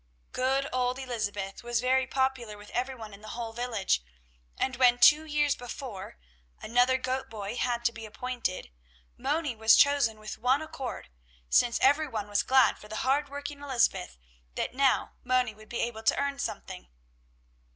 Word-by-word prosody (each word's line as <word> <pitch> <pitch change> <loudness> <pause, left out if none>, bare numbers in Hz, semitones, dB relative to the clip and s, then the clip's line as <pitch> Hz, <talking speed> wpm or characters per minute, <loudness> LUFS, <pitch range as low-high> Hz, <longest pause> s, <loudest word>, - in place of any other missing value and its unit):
Good 270 +2 0
old 250 0 0
Elizabeth 210 -7 -4
was 240 -1 -1
very 260 +2 +2
popular 260 -5 -1
with 205 0 -13
every 255 +2 -2
one 220 -4 -9
in 200 - -12
the 215 +2 -8
whole 230 -2 -4
village, 225 - 0 0.6
and 260 - -1
when, 245 -1 +5
two 300 +5 +6
years 295 -2 +1
before, 245 -5 -8 0.4
another 245 +3 +3
goat 260 0 -3
boy 210 0 -5
had 240 -1 -1
to 235 - +4
be 225 -1 -9
appointed, 235 - -4 0.4
Moni 300 - -1
was 220 0 +6
chosen 280 -6 +4
with 215 0 -8
one 260 +5 +2
accord, 270 - -6 0.4
since 235 - +3
every 290 +4 +4
one 215 -6 -4
was 205 0 +1
glad 260 0 +4
for 210 - -13
the 215 +3 -4
hard 280 +2 +2
working 285 0 -7
Elizabeth 245 - 0 0.4
that - - -2
now 270 0 +2
Moni 250 -2 +1
would 215 +1 -17
be 240 - -2
able 230 -2 -3
to 220 - +2
earn 280 0 -1
something. - - -5
245 Hz, 170 wpm, -29 LUFS, 220-265 Hz, 0.6 s, two